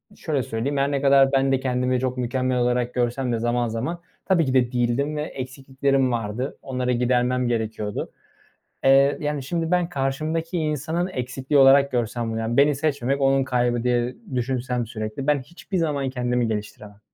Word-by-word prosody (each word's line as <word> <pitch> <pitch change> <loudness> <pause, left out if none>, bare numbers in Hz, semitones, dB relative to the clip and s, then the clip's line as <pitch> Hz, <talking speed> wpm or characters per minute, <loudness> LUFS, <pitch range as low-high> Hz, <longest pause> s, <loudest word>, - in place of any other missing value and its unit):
şöyle 145 -5 -2
söyleyeyim, 130 +3 -2
her 140 +1 +1
ne 140 -1 0
kadar 135 -1 +5
ben 135 0 +2
de 135 - +2
kendimi 125 -1 0
çok 130 0 -2
mükemmel 130 +1 -1
olarak 125 0 0
görsem 125 +1 -1
de 115 - -1
zaman 120 +1 0
zaman 130 +10 -3 0.2
tabii 175 -4 +3
ki 130 - -1
de 125 -2 +3
değildim 125 +4 0
ve 150 - -1
eksikliklerim 135 -1 -1
vardı. 115 +3 -3
Onları 125 -1 -2
gidermem 125 +1 +1
gerekiyordu. 110 -3 -3 0.7
Eee, 135 +1 +5
yani, 150 -2 -2
şimdi 165 +4 -2
ben 180 -1 +2
karşımdaki 155 +4 -2
insanın 160 +3 -1
eksikliği 130 -1 -1
olarak 140 +1 +6
görsem 120 -1 -1
bunu, 115 +1 -2
beni 145 +1 +5
seçmemek 140 -2 -1
onun 135 0 +3
kaybı 120 -2 0
diye 120 0 0 0.2
düşünsem 125 -1 -1
sürekli 110 +3 -5
ben 145 -2 +2
hiçbir 175 +6 -6
zaman 145 -5 0
kendimi 125 -2 0
geliştiremem 105 -1 -6
130 Hz, 165 wpm, -23 LUFS, 120-140 Hz, 0.7 s, olarak